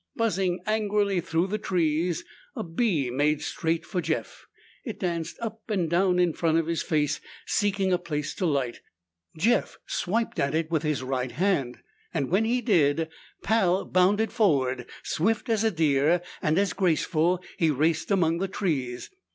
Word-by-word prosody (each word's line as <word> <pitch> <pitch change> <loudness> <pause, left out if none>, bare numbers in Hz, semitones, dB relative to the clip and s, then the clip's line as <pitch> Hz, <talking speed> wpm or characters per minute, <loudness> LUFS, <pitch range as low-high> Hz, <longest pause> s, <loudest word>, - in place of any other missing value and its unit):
Buzzing 195 -5 0
angrily 210 -3 +1
through 170 0 0
the 210 +3 -2
trees, 170 -3 0 0.3
a - - -3
bee 165 - 0
made 145 +3 +2
straight 165 0 -1
for 180 -3 -2
Jeff. - - -4 0.4
It 220 -5 -6
danced 170 -4 -2
up 225 -1 -6
and 190 -6 +1
down 180 +1 +3
in 175 -2 +3
front 165 0 +1
of 165 - +1
his 165 0 -1
face, 150 -3 0 0.2
seeking 195 -2 +1
a 180 - +2
place 150 -4 -3
to 185 - -1
light. 135 -6 -1 0.6
Jeff 230 +9 +1
swiped 225 +5 -1
at 140 +2 +1
it 160 0 -1
with 160 -3 +1
his 150 -4 -1
right 130 -1 -2
hand. 165 -10 0 0.4
When 185 +11 +1
he 245 +2 +1
did, 160 - +2 0.3
Pal 195 -4 +2
bounded 200 +5 +2
forward. 135 - +1
Swift 220 +8 0
as 225 -1 +2
a 225 - +4
deer, 160 -1 +2 0.2
and 155 +1 +1
as 200 0 +2
graceful, 175 -1 +1 0.2
he 165 - +3
raced 155 +3 +1
among 170 -4 +2
the 195 - 0
trees. 140 -11 -2
175 Hz, 160 wpm, -26 LUFS, 155-200 Hz, 0.6 s, a